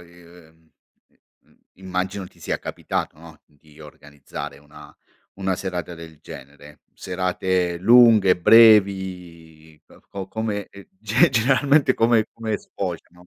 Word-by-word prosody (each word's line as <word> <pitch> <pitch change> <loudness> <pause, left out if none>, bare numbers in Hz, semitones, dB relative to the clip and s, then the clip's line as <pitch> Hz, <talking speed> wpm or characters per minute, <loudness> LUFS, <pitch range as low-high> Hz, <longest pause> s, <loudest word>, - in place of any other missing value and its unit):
i 85 - -18
ehm, 80 -2 -21 0.4
i - - -41
mhmm, - - -29 0.2
immagino 95 +1 -5
ti - - -22
sia - - -3
capitato, - - -5
no, 80 -2 -15
di 75 +1 -23
organizzare 75 -2 -10
una 75 0 -16 0.4
una 95 -1 -2
serata 90 -2 -6
del 80 -2 -13
genere. 75 +2 -14
Serate 90 -1 -2
lunghe, 110 -2 +5
brevi, 90 -7 +2
uhm, - - -20
o 95 -1 -7
come 105 -2 -4
e 100 -1 -15
ge 110 +4 +2
generalmente 135 +3 +2
come 115 -1 +2
come 110 -2 -4
sfociano? 90 -1 -8
90 Hz, 125 wpm, -21 LUFS, 80-105 Hz, 0.4 s, lunghe